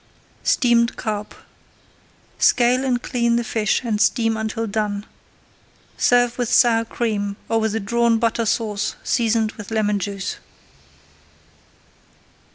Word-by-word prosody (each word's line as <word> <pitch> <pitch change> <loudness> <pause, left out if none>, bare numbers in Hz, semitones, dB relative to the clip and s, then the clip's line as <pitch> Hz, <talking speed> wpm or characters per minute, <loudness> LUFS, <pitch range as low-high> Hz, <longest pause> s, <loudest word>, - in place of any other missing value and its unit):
STEAMED 235 -2 +2
CARP 210 -2 -4 1.0
Scale 250 +2 +3
and 245 -2 0
clean 235 -2 0
the 240 - 0
fish 220 0 0
and 215 -3 -1
steam 225 -1 +2
until 220 +1 -3
done. 205 -1 -2 0.9
Serve 245 0 +2
with 245 -1 -1
sour 230 -2 +4
cream 210 -4 -2
or 225 - +1
with 220 -1 -1
a - - 0
Drawn 235 +2 +1
Butter 230 0 0
Sauce 215 -2 -1
seasoned 225 -2 +1
with 210 -3 -10
lemon 210 -2 0
juice. 200 0 -4
225 Hz, 120 wpm, -21 LUFS, 215-235 Hz, 1.0 s, sour